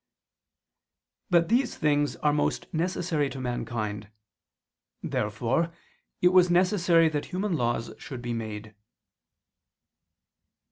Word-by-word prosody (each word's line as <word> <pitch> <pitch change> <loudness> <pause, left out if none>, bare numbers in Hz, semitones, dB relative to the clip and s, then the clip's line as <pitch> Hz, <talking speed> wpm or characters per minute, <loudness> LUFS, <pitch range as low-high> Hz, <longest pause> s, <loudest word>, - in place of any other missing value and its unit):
But 170 -2 +4
these 245 +2 +1
things 145 -1 +1
are 150 -1 +1
most 150 - 0
necessary 165 -3 0
to 135 - -7
mankind. 110 -4 -4 0.9
Therefore 115 +11 -1 0.5
it 180 - +7
was 180 -1 +5
necessary 175 -2 +4
that 150 -2 -2
human 190 +1 -2
laws 120 -4 -1
should 130 - -7
be 120 0 -2
made. 110 -1 -6
150 Hz, 100 wpm, -27 LUFS, 120-175 Hz, 0.9 s, it